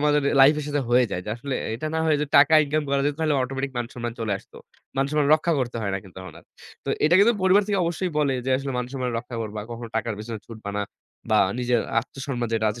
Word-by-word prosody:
আমাদের 150 Hz, 0 st, +3 dB, 0.2 s
লাইফের 150 Hz, +2 st, +5 dB
সাথে 145 Hz, -1 st, 0 dB
হয়ে 125 Hz, +1 st, +5 dB
যায়। 90 Hz, -, -2 dB
যে 105 Hz, -, -5 dB
আসলে 135 Hz, +3 st, -4 dB, 0.2 s
এটা 120 Hz, +7 st, -4 dB
না, -, -, +1 dB
হয়ে 155 Hz, -2 st, +3 dB
যে 150 Hz, -, -1 dB
টাকা 140 Hz, +2 st, +7 dB
ইনকাম 155 Hz, +2 st, 0 dB
করা 140 Hz, 0 st, +1 dB
যেত, 145 Hz, -, 0 dB
তাহলে 155 Hz, -2 st, +2 dB
অটোমেটিক 135 Hz, +1 st, -3 dB
মান-সম্মান 120 Hz, -1 st, -4 dB
চলে 110 Hz, -2 st, -1 dB
আসতো। -, -, -19 dB, 0.4 s
মান 135 Hz, -, +2 dB
সম্মান 150 Hz, -2 st, +2 dB
রক্ষা 165 Hz, +2 st, 0 dB
করতে 120 Hz, -2 st, -2 dB
হয় 100 Hz, -, -1 dB
না -, -, -1 dB
কিন্তু 95 Hz, -3 st, -17 dB
তখন 95 Hz, -, -10 dB
আর। -, -, -18 dB, 0.4 s
তো -, -, -7 dB, 0.2 s
এইটা 155 Hz, +3 st, +4 dB
কিন্তু 225 Hz, +4 st, +6 dB
পরিবার 190 Hz, +2 st, +5 dB
থেকে 205 Hz, -2 st, 0 dB
অবশ্যই 170 Hz, +2 st, -2 dB
বলে 145 Hz, -3 st, +2 dB
যে, 130 Hz, -, -1 dB
আসলে 135 Hz, 0 st, -4 dB
মান-সম্মান 125 Hz, 0 st, -3 dB
রক্ষা 120 Hz, +1 st, -8 dB
করবা। 105 Hz, -1 st, -5 dB
কখনো 115 Hz, 0 st, -6 dB
টাকার 110 Hz, 0 st, -1 dB
পেছনে 110 Hz, +1 st, -6 dB
ছুটবে 110 Hz, -3 st, -7 dB
না। -, -, 0 dB, 0.5 s
বা 110 Hz, -, +5 dB, 0.2 s
নিজের 120 Hz, -1 st, +1 dB, 0.2 s
আত্মসম্মান 130 Hz, -1 st, -5 dB
যেটা 110 Hz, -1 st, +1 dB
আছে, 105 Hz, -, -8 dB
135 Hz, 240 wpm, -24 LUFS, 115-150 Hz, 0.5 s, টাকা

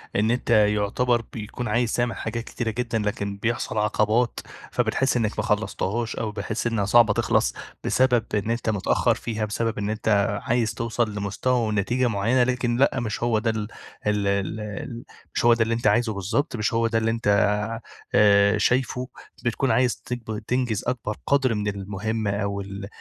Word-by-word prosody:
إن 110 Hz, +3 st, +2 dB
أنت 125 Hz, 0 st, -2 dB
يُعتبر 110 Hz, +3 st, +3 dB
بيكون 115 Hz, +2 st, -5 dB
عايز 115 Hz, +2 st, +1 dB
تعمل 120 Hz, -1 st, 0 dB
حاجات 115 Hz, +1 st, -4 dB
كتيرة 120 Hz, -1 st, -3 dB
جدًا، 120 Hz, -1 st, -2 dB
لكن 100 Hz, -1 st, -2 dB
بيحصل 115 Hz, 0 st, -2 dB
عقبات، 105 Hz, +3 st, +1 dB, 0.3 s
فبتحس 135 Hz, -1 st, +1 dB
إنك 110 Hz, -3 st, -1 dB
ما -, -, +1 dB
خلصتهاش، 110 Hz, +2 st, -1 dB
أو 110 Hz, -2 st, -3 dB
بتحس 105 Hz, +3 st, -3 dB
إنها 115 Hz, -4 st, 0 dB
صعبة 110 Hz, 0 st, +5 dB
تخلص -, -, +1 dB, 0.3 s
بسبب 125 Hz, -3 st, +3 dB
إن 105 Hz, +2 st, 0 dB
أنت 115 Hz, -1 st, -1 dB
متأخر 100 Hz, -3 st, +2 dB
فيها، 110 Hz, -2 st, -3 dB
بسبب 115 Hz, +1 st, -2 dB
إن 105 Hz, 0 st, -2 dB
أنت 105 Hz, -2 st, +1 dB
عايز 115 Hz, -2 st, +1 dB
توصل 115 Hz, -1 st, -1 dB
لمستوى 110 Hz, +4 st, 0 dB
ونتيجة 110 Hz, +5 st, +1 dB
معينة. 115 Hz, +4 st, +2 dB
لكن 125 Hz, -1 st, 0 dB
لأ، 130 Hz, 0 st, +3 dB
مش 110 Hz, -1 st, -3 dB
هو 115 Hz, -2 st, +2 dB
ده 115 Hz, +1 st, 0 dB
ال 105 Hz, -2 st, -2 dB, 0.4 s
ال 105 Hz, -1 st, +1 dB
ال 105 Hz, +4 st, -3 dB, 0.3 s
مش -, -, 0 dB
هو 120 Hz, -, +7 dB
ده 115 Hz, -1 st, +3 dB
اللي 115 Hz, +1 st, -1 dB
أنت 115 Hz, +2 st, 0 dB
عايزه 120 Hz, -2 st, +3 dB
بالضبط، 105 Hz, -, -1 dB
مش 105 Hz, +2 st, -1 dB
هو 115 Hz, 0 st, +2 dB
ده 115 Hz, -, 0 dB
اللي 115 Hz, 0 st, +1 dB
أنت 115 Hz, -2 st, -3 dB, 0.9 s
آآ، 100 Hz, 0 st, +5 dB
شايفه. 125 Hz, +3 st, +1 dB, 0.4 s
بتكون 125 Hz, +3 st, +1 dB
عايز 125 Hz, -1 st, +2 dB
تك 125 Hz, 0 st, -4 dB, 0.3 s
تنجز 125 Hz, -4 st, 0 dB
أكبر 115 Hz, -4 st, -2 dB
قدر 135 Hz, -4 st, +3 dB
من 105 Hz, 0 st, -2 dB
المهمة 105 Hz, +2 st, -2 dB
أو 100 Hz, 0 st, -2 dB
ال 100 Hz, 0 st, -7 dB
110 Hz, 170 wpm, -24 LUFS, 105-120 Hz, 0.9 s, هو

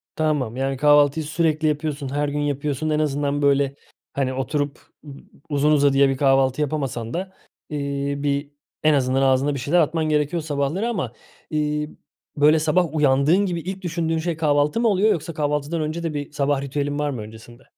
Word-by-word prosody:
Tamam. 145 Hz, -7 st, 0 dB
Yani 135 Hz, 0 st, -1 dB
kahvaltıyı 145 Hz, +1 st, +4 dB
sürekli 155 Hz, 0 st, 0 dB
yapıyorsun, 150 Hz, -2 st, -2 dB
her 145 Hz, +1 st, -1 dB
gün 145 Hz, +1 st, -3 dB
yapıyorsun. 145 Hz, +1 st, -2 dB
En 155 Hz, 0 st, +1 dB
azından, 145 Hz, -1 st, 0 dB
böyle, 140 Hz, -1 st, +2 dB, 0.4 s
hani, 130 Hz, -2 st, -1 dB
oturup 140 Hz, +2 st, -2 dB, 0.3 s
ıb 140 Hz, -2 st, -9 dB, 0.3 s
uzun 145 Hz, +1 st, +2 dB
uzadıya 140 Hz, -2 st, +4 dB
bir 135 Hz, -, -1 dB
kahvaltı 135 Hz, 0 st, +2 dB
yapamasan 135 Hz, -6 st, -3 dB
da, 190 Hz, +2 st, -4 dB, 0.4 s
iii, 140 Hz, -1 st, -3 dB
bir, 140 Hz, 0 st, -1 dB, 0.3 s
en 155 Hz, 0 st, +5 dB
azından 135 Hz, -1 st, +1 dB
ağzında 135 Hz, +2 st, +2 dB
bir 140 Hz, -, -4 dB
şeyler 150 Hz, +7 st, +2 dB
atman 160 Hz, 0 st, +1 dB
gerekiyor 150 Hz, +3 st, 0 dB
sabahları 155 Hz, +9 st, -1 dB
ama, 160 Hz, -, -3 dB, 0.4 s
iii, 150 Hz, 0 st, -1 dB, 0.5 s
böyle 150 Hz, +2 st, +5 dB
sabah 160 Hz, +1 st, +1 dB
uyandığın 150 Hz, +7 st, +3 dB
gibi 175 Hz, -3 st, -2 dB
ilk 190 Hz, +3 st, -6 dB
düşündüğün 165 Hz, -2 st, -1 dB
şey 165 Hz, 0 st, -2 dB
kahvaltı 150 Hz, +4 st, +2 dB
mı 235 Hz, -, +2 dB
oluyor 210 Hz, +1 st, +3 dB
yoksa 165 Hz, 0 st, -3 dB
kahvaltıdan 150 Hz, +1 st, -1 dB
önce 155 Hz, +2 st, -3 dB
de 165 Hz, -2 st, -2 dB
bir 145 Hz, -1 st, -5 dB
sabah 145 Hz, -1 st, 0 dB
ritüelin 145 Hz, +1 st, -2 dB
var 150 Hz, 0 st, 0 dB
mı 125 Hz, -6 st, -4 dB
öncesinde? 110 Hz, +3 st, -12 dB
145 Hz, 175 wpm, -22 LUFS, 140-155 Hz, 0.5 s, en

